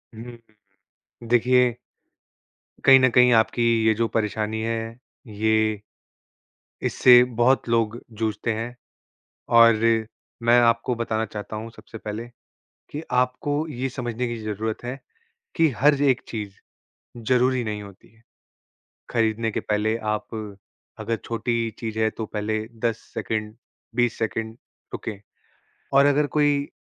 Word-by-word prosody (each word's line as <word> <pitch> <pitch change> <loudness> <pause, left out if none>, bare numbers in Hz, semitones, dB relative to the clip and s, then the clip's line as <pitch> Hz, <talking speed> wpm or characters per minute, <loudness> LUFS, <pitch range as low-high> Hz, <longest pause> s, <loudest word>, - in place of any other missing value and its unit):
हुँ, 110 - -8
हुँ। 110 -4 -21 0.6
देखिये 125 0 +3 1.1
कहीं 135 -1 +9
न 130 0 +4
कहीं 125 +1 +5
आपकी 115 +1 +2 0.2
ये 110 - +5
जो 115 +2 0
परेशानी 110 0 -2
है, 115 +1 -3 0.3
ये। 110 0 +1 1.1
इससे 125 -1 +7 0.2
बहुत 130 +1 +3
लोग 115 -1 +1 0.2
जूझते 110 +1 -1
हैं 115 +3 -5 0.8
और 115 -1 +8 0.7
मैं 120 +1 +5
आपको 115 +1 +2
बताना 115 -1 -1
चाहता 105 0 -7
हूँ 110 +2 -6
सबसे 110 +1 -11
पहले 110 +2 -6 0.6
कि 150 - -5
आपको 125 +3 0 0.2
ये 135 -2 -3
समझने 125 -2 -3
की 120 - -4
ज़रूरत 110 +2 -4
है 125 +2 -5 0.6
कि 165 -2 +4
हर 145 +1 +4
एक 135 -3 +3
चीज़ 105 -4 -6 0.7
ज़रूरी 130 0 +3
नहीं 105 -1 -4
होती 100 -1 -14
है। 115 - -26 0.9
ख़रीदने 115 -1 0
के - - -2
पहले 105 +1 0 0.2
आप 105 - -4 0.7
अगर 115 - -1
छोटी 115 0 -1 0.2
चीज़ 110 -1 -4
है 110 0 +3
तो 110 0 -6
पहले 110 +1 -2 0.3
10 115 -2 +1 0.2
सेकंड, 110 -1 -3 0.4
20 120 -1 +1
सेकंड 110 0 -3 0.4
रुकें, 105 -3 -5 0.7
और 140 +1 +6
अगर 145 +1 +3
कोई 145 -1 +2
115 Hz, 130 wpm, -24 LUFS, 110-125 Hz, 1.1 s, कहीं